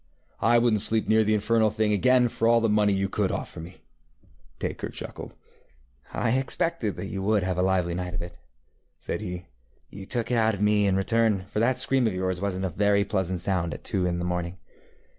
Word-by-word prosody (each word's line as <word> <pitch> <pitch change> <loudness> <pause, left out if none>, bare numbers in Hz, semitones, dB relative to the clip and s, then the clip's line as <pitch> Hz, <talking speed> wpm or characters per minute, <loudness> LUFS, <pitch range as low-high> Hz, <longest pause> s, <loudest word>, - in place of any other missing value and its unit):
ŌĆØ 110 - +2
ŌĆ£I 120 0 +5
wouldnŌĆÖt 115 -3 +3
sleep 110 +1 +1
near 110 0 +4
the 110 0 +2
infernal 110 +1 +2
thing 110 0 0
again 125 +4 +4
for 115 -1 -1
all 115 0 +5
the 115 - +1
money 105 -1 +3
you 95 0 0
could - - -1
offer - - -5
me. 80 +2 -8
ŌĆØ 80 -4 -27
Dacre - - -4
chuckled. - - -8 0.8
ŌĆ£I 130 +4 +1
expected 135 - -1
that 90 - -5
you 95 0 -5
would 105 0 +1
have 90 -1 -1
a - - +3
lively 90 -2 +1
night 90 0 -4
of 85 - -3
it, 85 - -8
ŌĆØ - - -22 0.6
said - - -5
he. 90 0 -6 0.5
ŌĆ£You 95 -1 -9
took 120 -1 -1
it 120 - +2
out 110 -1 +3
of 100 - -7
me 105 -1 +3
in 95 - +2
return, 105 0 +1
for 105 - -4
that 125 +3 +2
scream 130 -1 +2
of 100 - -2
yours 95 -1 -2
wasnŌĆÖt 95 -1 -2
a - - -1
very 100 +3 +2
pleasant 95 -4 -2
sound 90 -4 -1
at - - -11
two 90 -2 -1
in 85 -1 -1
the 90 - -3
morning. 90 0 -3
100 Hz, 225 wpm, -26 LUFS, 90-110 Hz, 0.8 s, ŌĆ£I